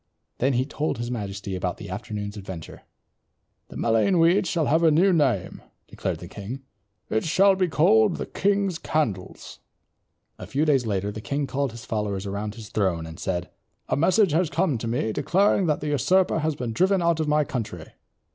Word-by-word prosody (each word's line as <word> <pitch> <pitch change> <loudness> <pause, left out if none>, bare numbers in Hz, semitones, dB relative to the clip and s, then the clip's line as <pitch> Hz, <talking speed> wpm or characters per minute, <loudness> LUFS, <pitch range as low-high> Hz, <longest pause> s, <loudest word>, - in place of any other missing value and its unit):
Then 135 +2 +2
he 125 +1 +1
told 150 0 -2
his 120 +1 -4
majesty 100 -4 -4
about 90 - -2
the - - -8
afternoon's 105 0 -5
adventure. 95 -5 -8 0.9
"The - - -10
mullein 115 - +2
weed 170 +3 +4
shall 165 -2 0
have 160 +4 +3
a 165 - +5
new 180 +5 +4
name," 135 - 0 0.3
declared - - -3
the - - -10
king. 120 +7 -7 0.5
"It 110 - +1
shall 195 +5 +4
be 185 -1 +1
called 130 -10 +4
the - - -4
King's 195 -3 0
Candles." 105 - -3 0.8
A - - -8
few 145 +3 0
days 135 -6 +2
later 100 -1 -1
the 110 +1 -7
king 140 +5 -2
called 140 0 -1
his 115 -1 -10
followers 105 -3 -2
around 100 +1 -4
his 110 -3 -10
throne 95 -6 0
seat 80 - -8
and 80 +2 -10
said, 85 -1 -3 0.4
"A - - +2
message 185 +5 +3
has 165 +2 +2
come 165 -8 0
to 115 - -4
me 115 -1 -1
declaring 185 - +2
that 150 - 0
the 150 - -2
usurper 175 +6 +2
has 155 -1 -1
been 120 -4 -4
driven 185 - +2
out 170 -1 +2
of 155 - 0
my 150 0 +3
country. 105 - -5
135 Hz, 195 wpm, -25 LUFS, 105-165 Hz, 0.9 s, a